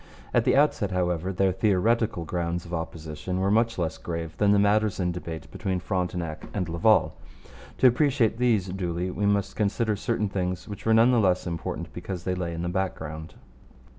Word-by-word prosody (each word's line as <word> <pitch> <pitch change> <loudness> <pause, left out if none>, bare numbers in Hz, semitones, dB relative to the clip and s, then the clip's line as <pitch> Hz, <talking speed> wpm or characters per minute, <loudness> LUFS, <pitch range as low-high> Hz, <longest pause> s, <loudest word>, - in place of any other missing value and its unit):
At - - +3
the - - +4
outset, - - +3
however, 90 0 -1
their 95 0 +2
theoretical 105 0 +1
grounds 85 +1 -2
of 85 - -9
opposition 80 +2 -4
were 95 +1 +1
much 115 +1 +2
less 85 -2 -2
grave 85 -1 -5
than 105 -1 +3
the 105 - +5
matters 105 0 +2
in 90 -1 +1
debate 85 -2 -7
between 95 -2 -2
Frontenac 90 -4 -3
and 90 -4 -1
Laval. 85 0 +3 0.6
To - - +2
appreciate 125 -3 +2
these 115 -6 +2
duly 90 -1 -2
we 100 +2 -1
must 100 -1 0
consider 110 +1 0
certain 105 0 -1
things 90 -2 -3
which 105 +1 -7
were 110 - +5
none 115 +3 +6
the 120 - +4
less 90 -4 +2
important 85 -2 -4
because 90 -3 -6
they 90 - -1
lay 90 -2 -3
in 85 0 -4
the - - -2
background. 80 -4 -4
95 Hz, 185 wpm, -26 LUFS, 85-105 Hz, 0.6 s, none